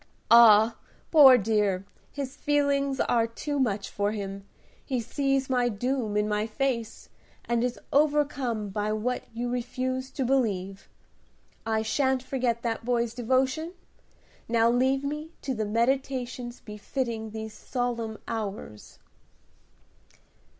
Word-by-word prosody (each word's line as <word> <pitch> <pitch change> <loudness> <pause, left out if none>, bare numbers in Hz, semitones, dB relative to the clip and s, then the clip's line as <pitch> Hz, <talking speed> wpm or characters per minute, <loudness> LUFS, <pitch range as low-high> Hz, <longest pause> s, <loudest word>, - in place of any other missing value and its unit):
"Ah! 225 -1 +7 0.3
poor 275 -5 +9
dear, 205 -3 0 0.3
his 275 -1 -5
feelings 280 -2 +1
are 230 -1 +2
too 285 +5 -4
much 210 -6 0
for 205 +1 -1
him. 200 -1 -6 0.4
He 260 -3 -2
sees 275 +3 0
my 250 -2 +1
doom 235 -1 -1
in 210 0 +1
my 210 +1 0
face, 230 -1 -3 0.4
and 235 0 0
is 245 -1 -2
overcome 280 -7 +1
by 210 +2 -2
what 245 +4 -2
you 235 +2 -3
refuse 255 +2 -3
to 265 - -1
believe. 200 -7 -1 0.8
I 220 -1 +1
shan't 260 +3 +1
forget 250 -3 -1
that 230 -1 -2
boy's 235 -1 0
devotion. 260 +7 0 0.8
Now 230 0 +3
leave 260 +3 +2
me 300 +3 -4
to 270 - -2
the 220 -3 -2
meditations 245 +1 -1
befitting 220 +1 -4
these 220 0 -7
solemn 235 -1 -3
hours." 205 - -6
240 Hz, 120 wpm, -27 LUFS, 220-265 Hz, 0.8 s, poor